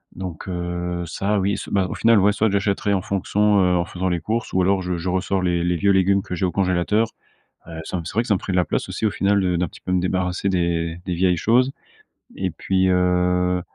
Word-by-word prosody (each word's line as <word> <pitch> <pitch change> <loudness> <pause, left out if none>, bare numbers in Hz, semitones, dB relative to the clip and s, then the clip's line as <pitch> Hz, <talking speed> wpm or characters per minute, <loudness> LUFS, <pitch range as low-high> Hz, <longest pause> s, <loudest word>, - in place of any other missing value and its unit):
donc 90 -3 -7
heu, 85 -1 -3
ça, 100 +5 -1
oui, 100 +1 +1
s - - -7
ben, 95 -2 +1
au - - -5
final, 115 -1 +4
ouais, 100 +1 +4
soit 110 +1 +1
j'achèterai 100 0 0
en 95 - +1
fonction, 105 +1 +1
heu, 90 -1 +3
en 85 - +2
faisant 95 +1 -4
les 85 -2 -1
courses 115 +2 -3
ou 95 - +2
alors 95 +1 +2
je 90 -1 -2
je 85 +2 -3
ressors 95 +1 0
les 85 -1 0
les 90 - +1
vieux 100 +4 +2
légumes 95 +1 +3
que 90 - -7
j'ai 90 +2 -1
au 90 - 0
congélateur, 100 +4 +1 0.6
heu, 80 -1 -7
ça 90 - -4
me 85 - -6
c'est - - -6
vrai 115 - +1
que 120 - -9
ça 105 - +4
me - - 0
ferait 95 - -5
de - - 0
la 90 - +3
place - - -2
aussi, - - -4
au 105 - +3
final, 100 +1 +1
de 90 -2 +1
d'un 90 - 0
petit - - -14
peu - - -6
me 90 -1 +2
débarrasser 90 +1 -1
des 85 -2 -1
des 90 - -2
vieilles 90 0 +2
choses 125 +9 +2 0.6
et 95 -2 -2
puis, 95 +3 0
heu, 90 0 +2
95 Hz, 260 wpm, -22 LUFS, 90-100 Hz, 0.6 s, final